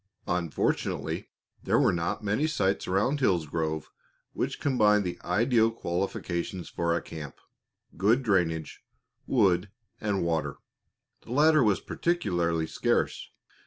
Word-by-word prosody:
Unfortunately, 90 -3 -1 0.3
there - - +2
were - - +4
not 85 +5 -2
many 110 +9 +1
sites 100 -10 0
around 105 +10 +1
Hillsgrove 80 - 0 0.4
which - - -2
combined 105 -6 +3
the 90 -2 -4
ideal 115 +5 +3
qualifications 90 -2 -3
for 85 -1 0
a - - -1
camp 75 -3 -8 0.6
good 110 +9 +3
drainage, 85 -7 0 0.5
wood, 100 -6 +3 0.3
and 100 -4 -1
water. 80 -2 -1 0.6
The 120 - -7
latter 155 +1 +5
was 105 -4 +2
particularly 85 - 0
scarce. - - -1
95 Hz, 115 wpm, -28 LUFS, 85-115 Hz, 0.6 s, latter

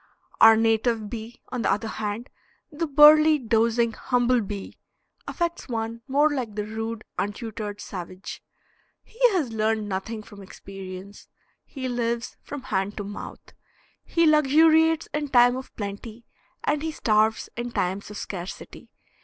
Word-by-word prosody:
Our 225 0 +8
native 225 -1 +1
bee, 230 +1 -7
on 250 -2 -3
the - - +1
other 210 +3 -1
hand, 215 +3 -4 0.4
"the 325 +2 -2
burly, 305 +2 +7
dozing 230 -1 +2
humble 245 +1 +1
bee," 200 -1 -7 0.5
affects 340 -4 -3
one 230 0 -3
more 290 +3 +3
like 245 -7 -3
the 210 -1 -2
rude, 225 +1 -5 0.2
untutored 210 0 -4
savage. 185 -1 -8 0.6
He 455 - -22
has 295 -11 0
learned 220 -1 0
nothing 210 +3 -4
from 205 -1 -13
experience. 195 0 -10 0.4
He 260 -3 -6
lives 235 -1 -2
from 285 -3 -8
hand 195 +2 -2
to 205 - -3
mouth. 205 +1 -9 0.5
He 335 -1 +2
luxuriates 315 +2 +4
in 295 0 -1
time 245 -2 +5
of 260 0 -7
plenty, 215 +3 -7 0.4
and 295 - 0
he 320 0 -2
starves 220 -5 +1
in 240 +1 -4
times 190 -1 -2
of 210 - -8
scarcity. 180 -1 -7
230 Hz, 140 wpm, -25 LUFS, 210-265 Hz, 0.6 s, Our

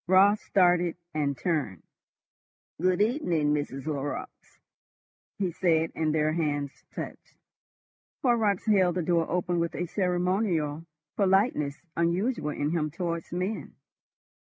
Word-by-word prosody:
Raut 195 +3 +6
started 175 -3 +2 0.2
and 145 -3 0
turned. 150 - -2 1.0
"Good 185 +1 +2
evening, 175 - +1
Mrs. 145 -2 -3
Horrocks," 155 - -5 0.8
he 190 -3 -1
said, 165 -2 +1
and 155 -1 0
their 155 0 +1
hands 145 -4 -1 0.2
touched. - - -8 0.9
Horrocks 225 -6 +2
held 190 -5 +3
the 180 - 0
door 165 -1 +1
open 175 0 0
with 170 0 -1
a 175 - -1
ceremonial 180 -4 0 0.3
politeness 190 - +2
unusual 170 - 0
in 150 0 -1
him 155 -3 0
towards 170 +1 -4
men. 185 +5 -3
175 Hz, 115 wpm, -28 LUFS, 155-190 Hz, 1.0 s, Raut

